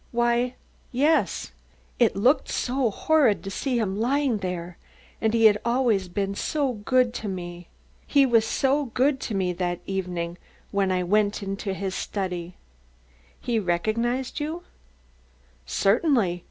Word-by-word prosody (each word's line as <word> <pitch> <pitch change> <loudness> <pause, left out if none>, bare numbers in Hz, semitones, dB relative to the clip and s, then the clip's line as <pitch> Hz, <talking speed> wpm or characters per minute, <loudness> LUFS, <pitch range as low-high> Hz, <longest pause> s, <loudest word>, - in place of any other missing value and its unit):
"Why, 240 +1 +1 0.4
yes; 295 +6 +1 0.5
it 235 -4 +4
looked 250 +9 +3
so 255 -1 0
horrid 270 -1 +2
to 195 - -5
see 255 +5 -1
him 205 -3 -1
lying 265 0 +1
there 180 -2 -5 0.4
and 220 - +2
he 225 0 +3
had 210 -1 +6
always 235 -6 +1
been 195 +2 -2
so 275 +5 -1
good 245 +3 +1
to 220 - -5
me. 175 -2 -6 0.4
He 280 -1 +5
was 235 -3 +4
so 275 +5 +1
good 265 +3 +1
to 220 - -4
me 185 -2 0
that 175 0 -2
very 195 - -3
evening 175 -2 -3 0.3
when 195 -2 +1
I 185 -1 +1
entered 200 +1 0 0.2
his 190 -1 -3
study. 180 -4 -4 0.8
"He 235 -2 0
recognised 230 - -1
you? 315 +4 -4 1.0
"Certainly. 205 - +2
220 Hz, 140 wpm, -25 LUFS, 190-255 Hz, 1.0 s, had